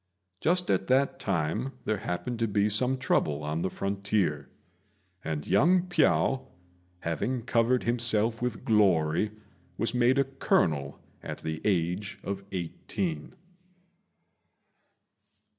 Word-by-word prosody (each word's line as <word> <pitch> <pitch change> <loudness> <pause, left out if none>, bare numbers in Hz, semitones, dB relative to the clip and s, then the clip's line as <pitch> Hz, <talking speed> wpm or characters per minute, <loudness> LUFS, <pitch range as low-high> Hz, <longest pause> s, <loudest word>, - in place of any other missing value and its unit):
Just 180 - +2
at 95 0 0
that 135 +2 +2
time 95 - -1
there 110 - 0
happened 115 +7 -4
to 115 - +1
be 105 0 +1
some 125 +5 +3
trouble 75 - 0
on 75 +2 -2
the 95 - 0
frontier, 100 -8 -1 0.7
and 75 -2 -3
young 175 +4 +4
Piao, 160 -6 +2 0.5
having 115 - -2
covered 120 +2 +2
himself 115 -1 +1
with 125 -2 -3
glory, 95 -4 +3 0.5
was 115 - 0
made 125 +2 +3
a 140 - +5
colonel 80 - 0 0.2
at - - -6
the 80 0 -4
age 90 0 0
of 100 0 -4
eighteen. 130 - -4
105 Hz, 115 wpm, -28 LUFS, 85-125 Hz, 0.7 s, a